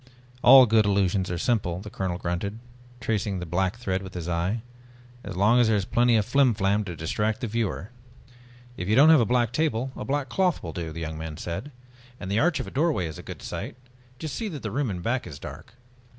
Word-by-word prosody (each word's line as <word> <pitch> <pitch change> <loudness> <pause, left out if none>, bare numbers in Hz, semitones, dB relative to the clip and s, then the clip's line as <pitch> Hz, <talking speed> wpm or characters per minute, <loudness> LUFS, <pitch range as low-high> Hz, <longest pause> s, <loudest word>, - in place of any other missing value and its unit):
"All 130 +1 +9
good 110 -2 +3
illusions 95 -1 +1
are 90 - -2
simple," 90 -4 0
the 105 +1 -9
colonel 90 -2 -2
grunted, 90 +5 -3 0.4
tracing 105 -4 -1
the 90 - -4
black 95 +5 -1
thread 95 -5 -2
with 95 -1 -10
his 85 -1 -5
eye. 90 +7 -1 0.6
"As 100 -2 -7
long 110 +6 +4
as 120 - +5
there 110 - +3
is 95 - -1
plenty 120 +2 +3
of 105 -2 +2
flimflam 110 -6 +2
to 90 -3 -6
distract 105 +7 -1
the - - -1
viewer." 110 -2 -2 0.9
"If 90 - -4
you 105 - +3
don't 145 +5 +7
have 155 -5 +7
a - - +3
black 120 -2 +2
table, 130 -4 0
a - - -5
black 140 0 -1
cloth 180 +7 0
will 80 -2 -5
do," 85 -2 -4
the 85 +2 -7
young 80 0 -5
man 80 -1 -6
said. 85 +13 -5 0.5
"And 95 - -6
the 105 - +2
arch 175 +3 +2
of - - -3
a - - -9
doorway 145 - +1
is 80 -2 -6
a - - -6
good - - -9
site, - - -5 0.4
just 155 +1 -5
see 225 - -3
that 155 -9 -7
the 110 - -3
room 135 +2 -1
in 90 -3 -4
back 125 +4 -1
is 70 - -8
dark." 115 - -10
105 Hz, 230 wpm, -26 LUFS, 90-125 Hz, 0.9 s, All